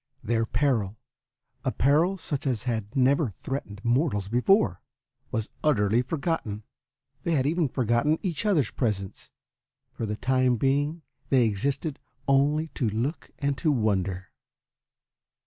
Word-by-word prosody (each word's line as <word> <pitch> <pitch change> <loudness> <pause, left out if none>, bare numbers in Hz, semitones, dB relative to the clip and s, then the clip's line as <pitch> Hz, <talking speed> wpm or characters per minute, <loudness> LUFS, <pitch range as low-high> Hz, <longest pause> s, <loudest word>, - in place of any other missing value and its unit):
Their 115 -1 +1
peril, 115 -8 0 0.7
a - - 0
peril 160 +8 +3
such 145 -5 -4
as 120 -4 -1
had 115 -2 -3
never 135 +1 +3
threatened 105 -1 -6
mortals 120 - +1
before, 125 - +3 0.5
was 110 -1 -3
utterly 115 -6 +3
forgotten. 135 - -2 0.6
They 170 - 0
had 135 -4 +2
even 160 0 +1
forgotten 125 +5 +2
each 170 -7 -2
other's 165 - +2
presence. 100 -6 -3 0.6
For 115 - -4
the 105 - -2
time 130 0 +2
being 145 +6 0 0.3
they 130 -3 +4
existed 135 - -1 0.3
only 145 +4 +3
to 120 -7 -1
look 130 +9 -3
and 140 -1 0
to 155 - +2
wonder. 95 -7 0
130 Hz, 130 wpm, -27 LUFS, 110-150 Hz, 0.7 s, they